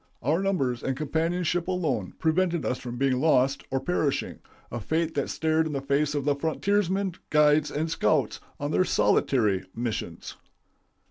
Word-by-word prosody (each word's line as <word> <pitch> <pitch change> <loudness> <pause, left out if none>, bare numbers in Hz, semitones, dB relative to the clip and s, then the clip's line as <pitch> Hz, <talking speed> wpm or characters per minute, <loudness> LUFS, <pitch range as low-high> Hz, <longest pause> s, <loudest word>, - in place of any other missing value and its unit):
Our 155 +8 +1
numbers 135 -12 0
and 135 -1 -2
companionship 165 +3 -1
alone 155 - -1
prevented 170 0 +1
us 125 - -1
from 120 -1 -6
being 130 -1 +1
lost 135 -3 +3
or 135 - 0
perishing, 140 -1 -1 0.3
a 120 - -3
fate 160 +7 -1
that 140 - -1
stared 160 0 +1
in 155 - -5
the 140 - -1
face 140 +2 +1
the 145 0 +1
frontiersmen, 190 +5 0 0.2
guides, 150 0 +4
and 155 +2 -2
scouts 150 -6 +1 0.2
on 145 +1 -2
their 185 - +3
solitary 105 - +2
missions. 115 -1 -4
150 Hz, 150 wpm, -26 LUFS, 135-165 Hz, 0.3 s, guides